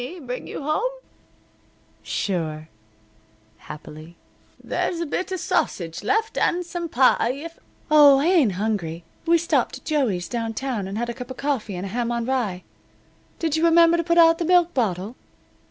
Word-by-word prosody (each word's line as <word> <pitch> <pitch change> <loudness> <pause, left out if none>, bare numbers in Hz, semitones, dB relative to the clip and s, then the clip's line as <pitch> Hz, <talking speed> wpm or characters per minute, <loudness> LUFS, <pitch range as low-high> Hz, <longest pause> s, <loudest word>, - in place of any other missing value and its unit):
"Heiny 285 +9 -7
bring 250 0 -5
you - - -6
home?" 365 - 0 1.1
"Sure," 160 -5 -3 0.9
happily. 155 +4 -11 0.5
"There's 340 - -2
a 340 - -1
bit 370 +5 -3
of 375 - -2
sausage 175 - -1
left, 435 - 0
and 355 0 +1
some 345 -1 -5
pie 255 -2 +3
if 330 +5 -9
" - - -31
"Oh, 290 -2 +8
I 280 - +1
ain't 325 - +3
hungry. 180 -5 -3 0.2
We 335 0 +5
stopped 335 +1 0
at - - -19
Joey's 230 - 0
downtown 230 -1 -3
and 195 +2 -5
had 240 +1 -2
a - - -6
cup 250 +1 -9
of 260 - -8
coffee 265 -8 -2
and 180 +2 -5
a - - -5
ham 240 +3 -2
on 235 -1 -2
rye. 230 -9 -2 0.7
Did 320 -3 -1
you 320 - 0
remember 335 0 +6
to 335 - 0
put 340 +1 +1
out 330 -1 +6
the 340 - -1
milk 350 0 +3
bottle?" 210 -2 -1
260 Hz, 175 wpm, -23 LUFS, 200-335 Hz, 1.1 s, Oh